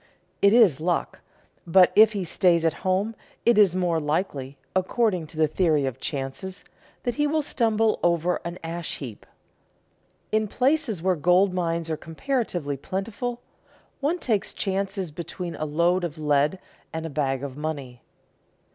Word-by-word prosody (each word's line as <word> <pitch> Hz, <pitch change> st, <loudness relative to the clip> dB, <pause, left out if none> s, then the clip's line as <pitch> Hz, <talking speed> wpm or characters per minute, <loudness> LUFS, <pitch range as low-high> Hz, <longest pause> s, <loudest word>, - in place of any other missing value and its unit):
It 200 Hz, -, +6 dB
is 210 Hz, -, +5 dB
luck; 175 Hz, +1 st, -1 dB, 0.5 s
but 180 Hz, +2 st, +6 dB
if 220 Hz, 0 st, +7 dB
he 200 Hz, -2 st, -2 dB
stays 170 Hz, -1 st, +2 dB
at 165 Hz, -, +3 dB
home 190 Hz, +4 st, 0 dB, 0.3 s
it 235 Hz, -2 st, +5 dB
is 195 Hz, -4 st, +5 dB
more 175 Hz, -3 st, +1 dB
likely, 145 Hz, -3 st, -2 dB, 0.2 s
according 185 Hz, -2 st, +1 dB
to 155 Hz, -, -12 dB
the 155 Hz, -1 st, +4 dB
theory 155 Hz, -3 st, +2 dB
of 130 Hz, -1 st, -4 dB
chances, 140 Hz, +9 st, -5 dB, 0.4 s
that 245 Hz, -, -1 dB
he 295 Hz, +4 st, +1 dB
will 310 Hz, +1 st, +1 dB
stumble 225 Hz, -4 st, +1 dB
over 175 Hz, +1 st, +2 dB
an 170 Hz, +1 st, -5 dB
ash 165 Hz, 0 st, -4 dB
heap. 120 Hz, -7 st, -9 dB, 1.0 s
In 215 Hz, 0 st, +1 dB
places 250 Hz, -, +1 dB
where 185 Hz, -1 st, +3 dB
gold 180 Hz, +4 st, +3 dB
mines 170 Hz, -2 st, -1 dB
are 160 Hz, -1 st, -2 dB
comparatively 170 Hz, -, -2 dB
plentiful, 205 Hz, -, -4 dB, 0.6 s
one 300 Hz, +5 st, 0 dB
takes 225 Hz, -, -1 dB
chances 195 Hz, -2 st, -2 dB
between 170 Hz, +2 st, -6 dB
a 155 Hz, -, -3 dB
load 170 Hz, +4 st, +1 dB
of 165 Hz, -2 st, -4 dB
lead 150 Hz, +2 st, +2 dB, 0.3 s
and 160 Hz, 0 st, -4 dB
a -, -, -4 dB
bag 135 Hz, -2 st, -1 dB
of 135 Hz, -2 st, -5 dB
money. 140 Hz, -5 st, -5 dB
175 Hz, 155 wpm, -25 LUFS, 155-205 Hz, 1.0 s, if